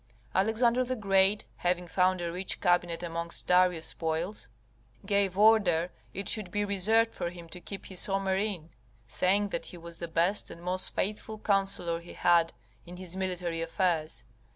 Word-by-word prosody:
Alexander 230 +5 +2
the 255 +1 -3
Great, 195 -1 +2
having 180 0 0
found 185 +1 +1
a 170 -1 -3
rich 185 +2 -1
cabinet 175 -1 +1
amongst 170 0 -2
Darius' 180 -2 +3
spoils, 160 - -2 0.6
gave 200 -2 +1
order 200 -6 +4 0.2
it 195 +2 -5
should 210 -5 +1
be 205 +2 -1
reserved 220 +3 +2
for 170 - -3
him 170 -1 -11
to 180 +2 -10
keep 195 +1 -8
his 190 -2 +1
Homer 195 -1 0
in, 190 -5 -3 0.3
saying: 195 - +1
that - - -3
he 180 - -8
was 170 0 -10
the 170 - -4
best 170 +5 +1
and 170 - -11
most 185 +1 0
faithful 215 +2 -2
counsellor 195 -5 +1
he 170 +1 -12
had 170 -2 +3 0.3
in 175 +5 -11
his 185 -1 -4
military 180 -3 -2
affairs. 165 -2 -1
185 Hz, 165 wpm, -29 LUFS, 170-200 Hz, 0.6 s, order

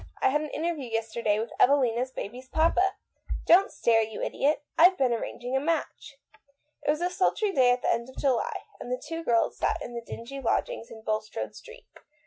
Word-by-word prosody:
I - - +3
had 295 +3 +1
an 305 - -4
interview 310 -5 -3
yesterday 225 -1 0
with 225 +2 -3
Evelina's 255 -2 +3
baby's 255 +2 -7
papa. 345 +4 +2 0.5
Don't 380 +4 +6
stare, 225 -1 +3
you 220 -1 -4
idiot. 290 +1 0
I've 365 +3 +6
been 255 -3 +2
arranging 245 +2 -4
a - - +3
match." 295 -2 -3 0.6
It - - -3
was 305 +2 +1
a 355 - +1
sultry 390 +3 +1
day 260 -8 +4
at 245 0 +1
the - - +3
end 235 +2 -3
of 260 - -15
July, 265 -4 0 0.2
and 245 - -7
the 250 - 0
two 330 +5 -6
girls 230 -6 +1
sat - - +1
in 240 - -7
the 235 - -4
dingy 235 +4 -8
lodgings 230 -1 -1
in 220 -1 -11
Bul 215 -1 0
strode 215 - -6
Street. - - -13
260 Hz, 200 wpm, -27 LUFS, 235-315 Hz, 0.6 s, Don't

